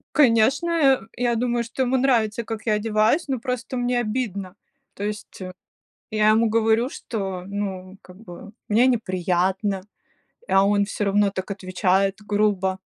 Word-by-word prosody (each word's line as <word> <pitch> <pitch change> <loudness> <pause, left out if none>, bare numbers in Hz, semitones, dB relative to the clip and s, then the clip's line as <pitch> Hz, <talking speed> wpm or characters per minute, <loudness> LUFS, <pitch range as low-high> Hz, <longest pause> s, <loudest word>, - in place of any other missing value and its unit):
Конечно, 270 +4 +4
э, 280 -6 +3 0.2
я 240 -1 +1
думаю, 240 0 0
что 260 +3 -3
ему 255 +1 0
нравится, 235 -4 +1
как 220 0 -6
я 215 - +2
одеваюсь, 215 +9 +1
но 260 -3 -2
просто 250 0 -4
мне 245 0 0
обидно. 210 -5 -3 0.4
То 200 - -7
есть, 210 -2 -6 0.7
я 215 0 +3
ему 225 +1 +3
говорю, 225 +3 +2
что 190 -9 -5
ну 195 -2 -5
как 180 0 -15
бы 195 -1 -11 0.2
мне 230 +5 +4
неприятно, 190 -2 0 0.7
а 195 0 +4
он 205 0 +3
всё 205 +1 -3
равно 200 0 +3
так 190 +1 -5
отвечает 190 0 0
грубо. 200 -3 +1
215 Hz, 150 wpm, -23 LUFS, 195-240 Hz, 0.7 s, Конечно